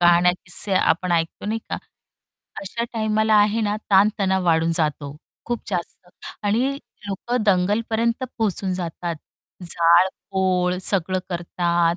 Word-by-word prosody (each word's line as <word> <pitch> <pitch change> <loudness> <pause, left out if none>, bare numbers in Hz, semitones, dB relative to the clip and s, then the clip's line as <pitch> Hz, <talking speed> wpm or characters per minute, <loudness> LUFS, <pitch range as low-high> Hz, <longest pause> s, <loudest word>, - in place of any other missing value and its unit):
कहाण्या-किस्से 175 +2 +3
आपण 180 -1 +2
ऐकतो, 165 +3 -1
नाही 220 +2 -1
का? - - -1 0.8
अशा 230 +4 -3
टाईमाला 220 -1 +1
आहे 210 +2 +4
ना 210 -1 0
ताण-तणाव 195 -1 +3
वाढून 165 -1 +3
जातो 150 -3 -1 0.3
खूप 240 -1 -2
जास्त 180 0 -4 0.4
आणि 245 +7 +1 0.3
लोक 200 +5 -3
दंगलपर्यंत 220 +5 +1
पोहोचून 200 -3 0
जातात. 170 -1 -4 0.5
जाळपोळ 180 +2 +2
सगळं 185 -1 +1
करतात, 175 -1 0
185 Hz, 110 wpm, -22 LUFS, 175-210 Hz, 0.8 s, आहे